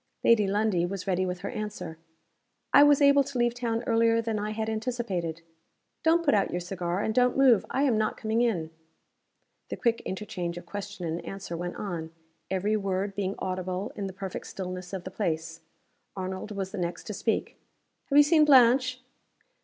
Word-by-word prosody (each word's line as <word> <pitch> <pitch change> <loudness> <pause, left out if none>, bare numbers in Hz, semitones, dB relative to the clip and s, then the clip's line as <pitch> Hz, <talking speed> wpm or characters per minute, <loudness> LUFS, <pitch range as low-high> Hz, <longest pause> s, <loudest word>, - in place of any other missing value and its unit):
Lady 215 -3 +5
Lundie 205 -3 +1
was 190 +2 -3
ready 185 -1 0
with 180 0 -4
her 200 - -4
answer. 210 -7 -6 0.7
"I - - +9
was 290 0 +6
able 280 0 +6
to 270 -1 -6
leave 240 0 +2
town 235 -1 -2
earlier 230 0 +3
than 225 -2 -1
I 210 +1 -2
had 220 0 -3
anticipated. 215 -8 -3 0.6
Don't 335 +1 +3
put 285 - +4
out 200 -2 +2
your 175 - -2
cigar; 180 0 -3
and 220 - -1
don't 250 +1 +3
move. 260 -6 +5
I 270 - 0
am 245 -6 +3
not 215 - 0
coming 220 0 0
in." 175 -10 0 1.0
The - - -4
quick 230 -1 +1
interchange 185 -3 -4
of 175 - -8
question 205 -1 -6
and 165 +1 -3
answer 195 -3 -6
went 175 +1 -4
on; 170 -5 -4 0.4
every 195 +3 0
word 195 -1 -1
being 195 0 -2
audible 185 +1 -3
in 200 -2 -3
the - - -5
perfect 190 -1 -6
stillness 185 -1 -6
of 190 -2 -5
the 185 - -7
place. 165 -4 -3 0.5
Arnold 190 +1 -4
was 195 -2 -4
the - - -5
next 175 0 -3
to 210 - -6
speak. 215 +3 -2 0.5
"Have 280 - +1
you 290 - +10
seen 310 +1 +5
Blanche?" 255 -2 +5
205 Hz, 185 wpm, -28 LUFS, 185-230 Hz, 1.0 s, you